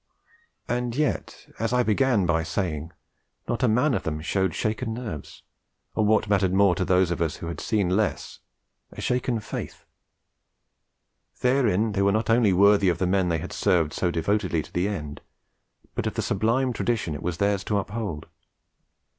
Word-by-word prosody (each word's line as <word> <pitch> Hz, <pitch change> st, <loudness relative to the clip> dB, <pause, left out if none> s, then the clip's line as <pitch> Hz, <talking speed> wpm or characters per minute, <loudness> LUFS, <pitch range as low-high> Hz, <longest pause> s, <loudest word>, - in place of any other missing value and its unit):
And 120 Hz, -1 st, -2 dB
yet, 150 Hz, +1 st, -2 dB
as 115 Hz, +1 st, -1 dB
I 125 Hz, 0 st, +3 dB
began 115 Hz, -2 st, +2 dB
by 85 Hz, -1 st, +2 dB
saying, 80 Hz, -2 st, -3 dB, 0.6 s
not 120 Hz, -, -2 dB
a 125 Hz, -, +4 dB
man 125 Hz, +6 st, +3 dB
of -, -, 0 dB
them 75 Hz, -1 st, -3 dB
showed 95 Hz, +2 st, -1 dB
shaken 110 Hz, +1 st, -2 dB
nerves, 110 Hz, -, -7 dB, 0.5 s
or 110 Hz, -, +1 dB
what 110 Hz, +1 st, +3 dB
mattered 95 Hz, -2 st, +2 dB
more 100 Hz, -2 st, +5 dB
to 95 Hz, -, -1 dB
those 90 Hz, -1 st, +2 dB
of 85 Hz, -, -2 dB
us 80 Hz, -2 st, 0 dB
who -, -, -8 dB
had 85 Hz, 0 st, -5 dB
seen 105 Hz, -5 st, 0 dB
less, 100 Hz, +4 st, -1 dB, 0.5 s
a -, -, -11 dB
shaken 125 Hz, -2 st, 0 dB
faith. 105 Hz, -, -7 dB, 1.6 s
Therein 115 Hz, -5 st, +2 dB
they 100 Hz, -1 st, 0 dB
were 100 Hz, 0 st, +4 dB
not 110 Hz, +2 st, 0 dB
only 115 Hz, -3 st, +4 dB
worthy 100 Hz, +1 st, +5 dB
of 85 Hz, -, 0 dB
the 95 Hz, -, 0 dB
men 90 Hz, 0 st, +1 dB
they 85 Hz, -, +1 dB
had -, -, -6 dB
served 80 Hz, -4 st, +1 dB
so 90 Hz, -, 0 dB
devotedly 85 Hz, -1 st, 0 dB
to -, -, -16 dB
the 90 Hz, +2 st, +1 dB
end, 75 Hz, -8 st, -5 dB, 0.7 s
but -, -, -2 dB
of -, -, -3 dB
the -, -, -1 dB
sublime 115 Hz, +6 st, +1 dB
tradition 115 Hz, -10 st, -1 dB
it 75 Hz, -, -6 dB
was 90 Hz, -1 st, -3 dB
theirs 100 Hz, 0 st, +1 dB
to 105 Hz, -, 0 dB
uphold. 100 Hz, -6 st, -4 dB
100 Hz, 180 wpm, -25 LUFS, 90-115 Hz, 1.6 s, more